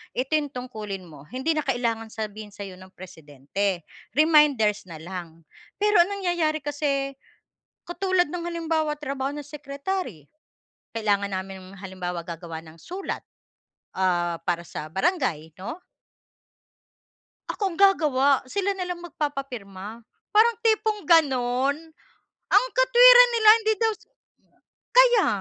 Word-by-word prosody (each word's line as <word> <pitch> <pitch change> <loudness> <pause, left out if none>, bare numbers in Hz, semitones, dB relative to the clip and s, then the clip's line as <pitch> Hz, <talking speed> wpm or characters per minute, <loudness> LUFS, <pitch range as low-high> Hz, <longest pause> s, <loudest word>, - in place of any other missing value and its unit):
ito 260 +4 -2
yung 295 -1 +1
tungkulin 215 -7 -6
mo. 150 -2 -14
Hindi 265 +6 -1
na 305 - 0
kailangan 230 -3 -1
sabihin 215 -1 -6
sa'yo 195 -3 -8
ng 185 0 -14
presidente, 170 +2 -4 0.3
reminders 290 - +4
nalang. 165 0 -8 0.4
Pero 420 -2 +4
ang 370 - -7
nangyayari 335 -4 0
kasi, 285 -2 -1 0.8
katulad 365 -1 +1
ng 350 -1 -4
halimbawa, 320 -2 -1
trabaho 275 -2 -3
ng 295 -2 -7
secretary, 280 - -5 0.7
kailangan 200 -2 0
namin 190 0 -6
halimbawa 180 -3 -5
gagawa 165 -1 -7
ng 160 0 -14
sulat, 375 +2 -5 0.8
ah, 175 -2 +1
para 170 -1 0
sa 150 - -6
barangay, 190 - -1
'no? 235 - -6 1.7
Ako 395 -4 -2
ang - - -10
gagawa. 305 -9 +4 0.2
Sila 395 +8 -2
na 365 - -3
lang 355 -1 -5
magpapapirma. 240 - -6 0.2
Parang 445 +1 +4
tipong 435 -3 0
gano'n. 270 -4 +3 0.8
Ang - - +6
katwiran - - +8
nila, 435 -2 +4 0.2
hindi 440 0 +3
daw 450 -1 +3 1.0
kaya - - +6
270 Hz, 120 wpm, -25 LUFS, -, 1.7 s, katwiran